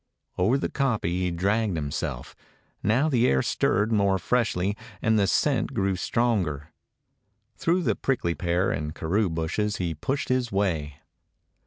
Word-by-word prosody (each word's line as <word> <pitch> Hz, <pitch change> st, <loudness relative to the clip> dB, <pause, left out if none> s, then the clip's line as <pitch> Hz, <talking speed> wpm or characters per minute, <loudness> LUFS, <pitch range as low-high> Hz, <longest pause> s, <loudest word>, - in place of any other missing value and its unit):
Over 105 Hz, +9 st, +2 dB
the -, -, -1 dB
kopje 135 Hz, -6 st, -1 dB
he 90 Hz, 0 st, 0 dB
dragged 100 Hz, +3 st, 0 dB
himself. 70 Hz, -5 st, -4 dB, 0.5 s
Now 115 Hz, +10 st, +2 dB
the 125 Hz, -5 st, +3 dB
air 65 Hz, -1 st, +2 dB
stirred 105 Hz, +3 st, +1 dB
more 100 Hz, -3 st, +3 dB
freshly, 100 Hz, -3 st, 0 dB, 0.2 s
and 110 Hz, -1 st, +2 dB
the 100 Hz, -, +3 dB
scent -, -, +1 dB
grew 95 Hz, -1 st, +1 dB
stronger. 90 Hz, -, -1 dB, 0.8 s
Through 175 Hz, +2 st, +1 dB
the -, -, +1 dB
prickly 120 Hz, -11 st, 0 dB
pear 85 Hz, +4 st, 0 dB
and 75 Hz, +1 st, -3 dB
karoo 95 Hz, +5 st, 0 dB
bushes 85 Hz, +6 st, -1 dB
he 85 Hz, -3 st, -2 dB
pushed 130 Hz, -, -3 dB
his 130 Hz, -2 st, 0 dB
way. 85 Hz, -8 st, -1 dB
100 Hz, 145 wpm, -26 LUFS, 85-115 Hz, 0.8 s, the